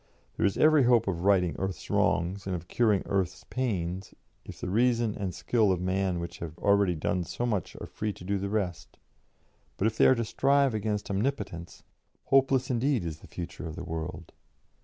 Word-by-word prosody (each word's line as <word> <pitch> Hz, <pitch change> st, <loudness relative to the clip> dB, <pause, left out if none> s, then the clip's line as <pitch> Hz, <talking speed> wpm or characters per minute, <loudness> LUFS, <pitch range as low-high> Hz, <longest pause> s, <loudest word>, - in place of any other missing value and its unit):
There 110 Hz, -, +2 dB
is 100 Hz, -, -2 dB
every 155 Hz, -3 st, +5 dB
hope 120 Hz, -2 st, +4 dB
of 90 Hz, -1 st, -2 dB
righting 90 Hz, -4 st, +3 dB
earth's 95 Hz, -3 st, -4 dB
wrongs 95 Hz, +3 st, +1 dB
and 95 Hz, -, -1 dB
of 90 Hz, 0 st, -7 dB
curing 110 Hz, -3 st, +2 dB
earth's 95 Hz, -3 st, -1 dB
pains 95 Hz, -7 st, -2 dB, 0.3 s
if -, -, -10 dB
the -, -, -4 dB
reason 115 Hz, +2 st, +2 dB
and 100 Hz, -3 st, -3 dB
skill 110 Hz, +3 st, +1 dB
of 90 Hz, -, 0 dB
man 95 Hz, 0 st, 0 dB
which 85 Hz, 0 st, -6 dB
have 80 Hz, -1 st, -7 dB
already 100 Hz, -3 st, +3 dB
done 90 Hz, +3 st, -1 dB
so 120 Hz, -, -3 dB
much 105 Hz, -7 st, -2 dB
are -, -, -6 dB
free 105 Hz, 0 st, -3 dB
to 90 Hz, -, -13 dB
do 100 Hz, +2 st, -1 dB
the 100 Hz, +1 st, -3 dB
rest; 90 Hz, -6 st, -3 dB, 0.8 s
but 95 Hz, -, 0 dB
if 110 Hz, 0 st, 0 dB
they -, -, +7 dB
are 130 Hz, -, +6 dB
to 115 Hz, -1 st, -1 dB
strive 140 Hz, +2 st, +2 dB
against 105 Hz, -1 st, -2 dB
omnipotence, 100 Hz, -6 st, -3 dB, 0.4 s
hopeless 135 Hz, -1 st, +3 dB
indeed 125 Hz, -4 st, +1 dB
is 80 Hz, -2 st, -5 dB
the -, -, -14 dB
future 90 Hz, 0 st, -7 dB
of 80 Hz, -, -7 dB
the 90 Hz, -, -6 dB
world. 80 Hz, -2 st, -6 dB
100 Hz, 195 wpm, -28 LUFS, 90-115 Hz, 0.8 s, they